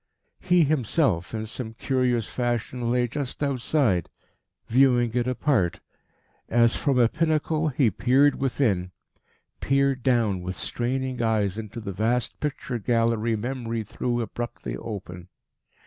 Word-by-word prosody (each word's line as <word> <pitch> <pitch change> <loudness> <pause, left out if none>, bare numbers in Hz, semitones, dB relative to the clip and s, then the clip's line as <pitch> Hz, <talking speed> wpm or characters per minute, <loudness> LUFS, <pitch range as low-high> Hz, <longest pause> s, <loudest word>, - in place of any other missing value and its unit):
He 180 -2 +3
himself, 135 - +1
in 110 -1 -3
some 110 0 -6
curious 125 -4 0
fashion, 120 +1 -2
lay 125 0 +2
just 140 +3 -4
outside, 130 - +1 0.6
viewing 125 -1 +3
it 120 0 0
apart. 125 - +1 0.7
As 115 0 +4
from 140 -4 +1
a 120 -2 +5
pinnacle, 160 +1 0
he 130 -5 +2
peered 135 +8 +3
within 110 -9 +1 0.7
peered 135 -1 +1
down 115 -7 +1
with 90 +1 -5
straining 130 +1 -2
eyes 110 -3 +1
into 110 +1 -7
the 105 -3 -5
vast 115 +5 0
picture 135 -4 -3
gallery 115 0 +1
Memory 115 0 -3
threw 120 +3 -2
abruptly 120 +1 -5
open. 90 -5 -7
120 Hz, 125 wpm, -25 LUFS, 110-135 Hz, 0.7 s, a